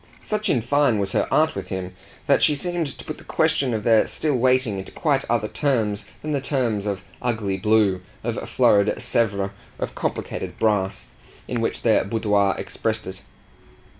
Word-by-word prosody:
Such 215 Hz, 0 st, -1 dB
in 120 Hz, -, +2 dB
fine 140 Hz, -3 st, +3 dB
was 100 Hz, -1 st, -1 dB
her -, -, +1 dB
art 155 Hz, +1 st, +3 dB
with -, -, -5 dB
him 95 Hz, -1 st, -5 dB, 0.3 s
that -, -, +3 dB
she 150 Hz, -, +4 dB
seemed 175 Hz, +1 st, -1 dB
to 135 Hz, -, -7 dB
put -, -, -6 dB
the -, -, -13 dB
question 135 Hz, -3 st, +1 dB
of 110 Hz, -2 st, -2 dB
their 110 Hz, -2 st, +4 dB
still 155 Hz, -2 st, 0 dB
waiting 125 Hz, -4 st, +2 dB
into 95 Hz, -, -8 dB
quite 140 Hz, -4 st, +1 dB
other 115 Hz, -2 st, +1 dB
terms 110 Hz, -7 st, 0 dB, 0.2 s
than 155 Hz, -, -3 dB
the 140 Hz, -2 st, 0 dB
terms 120 Hz, -7 st, -1 dB
of 100 Hz, -2 st, -3 dB, 0.2 s
ugly 110 Hz, -5 st, -1 dB
blue, 100 Hz, -1 st, +2 dB, 0.2 s
of -, -, -3 dB
florid 100 Hz, 0 st, +3 dB
Sevres, 100 Hz, -4 st, 0 dB, 0.3 s
of -, -, -4 dB
complicated -, -, -4 dB
brass, 105 Hz, -3 st, 0 dB, 0.4 s
in 120 Hz, -2 st, -2 dB
which 115 Hz, -, -2 dB
their 115 Hz, -2 st, +4 dB
boudoir 100 Hz, -2 st, +1 dB
expressed 110 Hz, 0 st, -3 dB
it. 95 Hz, 0 st, -8 dB
110 Hz, 175 wpm, -23 LUFS, 100-130 Hz, 0.4 s, she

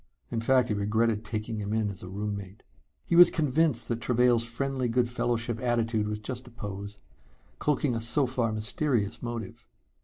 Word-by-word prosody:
In 115 Hz, -2 st, -1 dB
fact, 125 Hz, +1 st, +3 dB
he -, -, +1 dB
regretted 105 Hz, +2 st, +1 dB
taking 110 Hz, 0 st, -4 dB
him 105 Hz, 0 st, -3 dB
in 110 Hz, -1 st, +1 dB
as 95 Hz, -, -11 dB
a 90 Hz, -, -8 dB
roommate. 100 Hz, 0 st, -5 dB, 0.4 s
He 170 Hz, -, 0 dB
was 175 Hz, 0 st, +9 dB
convinced 155 Hz, -5 st, +2 dB
that 115 Hz, -1 st, -2 dB
Travail's 125 Hz, -1 st, +3 dB
friendly 130 Hz, +2 st, -2 dB
good 120 Hz, +1 st, +2 dB
fellowship 120 Hz, -1 st, -1 dB
attitude 115 Hz, -3 st, 0 dB
was 105 Hz, 0 st, -2 dB
just 125 Hz, +3 st, -7 dB
a -, -, -10 dB
pose, 100 Hz, -3 st, -7 dB, 0.6 s
cloaking 145 Hz, -3 st, +1 dB
a 115 Hz, -, -2 dB
so 130 Hz, +5 st, +2 dB
far 125 Hz, -3 st, 0 dB
mysterious 110 Hz, -, -1 dB
motive. 120 Hz, 0 st, -6 dB
115 Hz, 175 wpm, -28 LUFS, 105-125 Hz, 0.6 s, was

